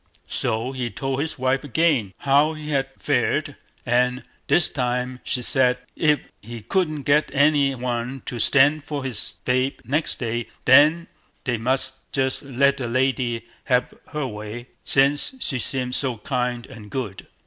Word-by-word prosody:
So 115 +4 -2
he 125 -3 -3
told 135 +5 -3
his 160 - -3
wife 130 +2 0
again 145 - +1
how 145 +3 +3
he 155 -1 -8
had 135 -2 0
fared, - - 0 0.3
and 125 +1 +1 0.2
this 175 - +5
time 125 0 -2
she 125 - -2
said, 125 0 +3 0.2
if 150 -2 +2 0.2
he 115 +2 -8
couldn't 155 - -1
get 145 +2 +3
any 140 -1 +4
one 125 +1 -3
to 120 - -4
stand 145 +5 +4
for 145 -2 -4
his 125 -6 -2
babe 130 +2 +1
next 145 +7 0
day, 120 -1 -3 0.2
they 150 -2 +3
must 130 +3 -1
just 130 -1 0
let 140 0 +2
the 125 -3 -3
lady 125 -2 0 0.2
have 125 -1 +1
her 150 -2 -3
way, 110 +2 -7
since 140 - +3
she 135 - -1
seemed 125 0 -2
so 130 -3 0
kind 125 -1 -2
and 105 -2 -12
good. 105 -4 -5
130 Hz, 150 wpm, -23 LUFS, 120-145 Hz, 0.3 s, this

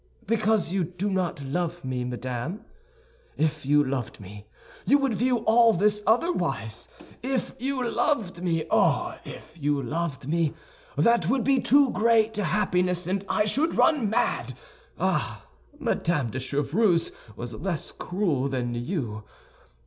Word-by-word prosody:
"Because 215 -4 +1
you 195 -2 +1
do 180 +4 -3
not 180 -6 -1
love 170 +4 -3
me, 130 -1 -2
madame! 125 - -4 0.7
If 155 -2 -1
you 145 +1 +5
loved 130 -4 -3
me, 105 +1 -11 0.4
you 285 - +5
would 275 -4 0
view 245 +1 +1
all 230 0 +6
this 210 +3 +2
otherwise. 165 - 0 0.3
If 260 +1 -2
you 260 -1 -1
loved 235 - 0
me, 165 -3 0
oh, - - +2
if 155 - -11
you 145 -2 0
loved 140 -1 -3
me, 165 -1 0 0.4
that 235 0 +3
would 260 0 +2
be 275 -1 +3
too 275 -1 +4
great 225 0 +3
happiness, 180 -3 +1
and 190 +2 -1
I 210 - +2
should 290 +10 +1
run 285 -10 +3
mad. 220 - 0 0.4
Ah, - - -1 0.3
Madame 170 - 0
de 130 - -3
Chevreuse 150 - +1 0.2
was 120 +2 -6
less 170 - -3
cruel 170 -8 -1
than 125 -2 -2
you. 120 - -3
180 Hz, 140 wpm, -26 LUFS, 140-225 Hz, 0.7 s, all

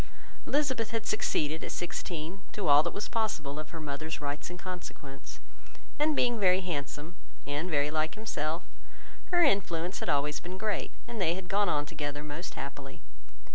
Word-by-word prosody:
Elizabeth 260 -6 +2
had 225 0 -1
succeeded, 155 +1 +1
at - - -3
sixteen, 175 +1 -3
to 200 -5 -1
all 145 0 +9
that 170 +2 -1
was 205 - -3
possible, 155 -11 0
of 155 0 -6
her 165 - -6
mother's 155 +1 -3
rights 145 +1 -3
and 175 - -6
consequence; 175 -7 -7 0.6
and 300 0 +4
being 240 -3 +3
very 185 -1 +5
handsome, 150 -1 -3 0.3
and 145 +5 -1
very 145 -2 +3
like 155 0 +1
himself, 165 -7 -1 0.6
her 350 -1 +5
influence 180 - +2
had - - -2
always 145 +1 +2
been 180 +2 -6
great, 210 +1 0 0.2
and 235 -3 -4
they 170 -1 +3
had 190 -1 -6
gone 200 +2 +3
on 145 0 +2
together 145 -2 -3
most 150 +4 -5
happily. 140 -1 -6
165 Hz, 170 wpm, -31 LUFS, 150-200 Hz, 0.6 s, all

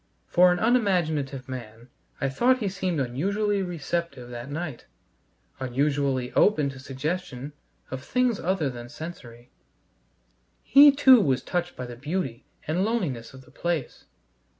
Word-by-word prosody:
For 180 +1 +5
an 180 - +1
unimaginative 170 - +1
man 120 -2 -8 0.3
I 135 - 0
thought 245 - +3
he 210 -6 -2
seemed 185 -4 -2
unusually 200 - 0
receptive 170 -6 -4
that 120 +2 -7
night, 150 -4 -5 0.7
unusually 135 0 0
open 150 -9 +3
to 135 -1 -9
suggestion 140 0 -4 0.4
of 130 0 -5
things 250 -3 +1
other 180 -4 0
than 120 -1 -9
sensory. 120 -7 -10 1.1
He 285 +3 +8
too 265 -4 +7
was 130 -6 +1
touched 175 0 -2
by 125 - -5
the 120 0 -8
beauty 135 -2 -4 0.2
and 170 +5 +1
loneliness 170 - -2
of 130 - -13
the - - -19
place. 170 -6 -3
150 Hz, 135 wpm, -26 LUFS, 130-185 Hz, 1.1 s, He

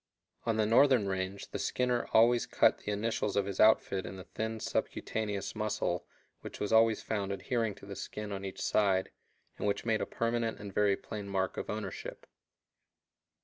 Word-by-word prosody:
On 115 -1 +2
the 110 - +3
northern 120 -1 +5
range 95 +1 -3
the - - -3
skinner 125 -1 0
always 120 +2 +5
cut - - +3
the 105 - -4
initials 105 0 -1
of 100 -1 +2
his 100 -1 -5
outfit 105 -3 +4
in - - -7
the 95 - -8
thin 110 +3 -4
subcutaneous 105 -2 -2
muscle 105 -5 -1 0.3
which - - -9
was 105 - -1
always 110 -1 +5
found 100 -3 -2
adhering 110 +1 -1
to - - -13
the 100 0 -7
skin 105 +1 -6
on 100 -1 -4
each 95 -1 -5
side, 95 -3 +2 0.5
and - - -1
which 100 - -1
made 110 -2 +1
a - - -2
permanent 115 -1 -1
and 100 -2 -8
very 100 -1 +3
plain 105 -2 -7
mark 95 -1 -1
of - - -5
ownership. - - -5
105 Hz, 180 wpm, -32 LUFS, 100-115 Hz, 0.5 s, northern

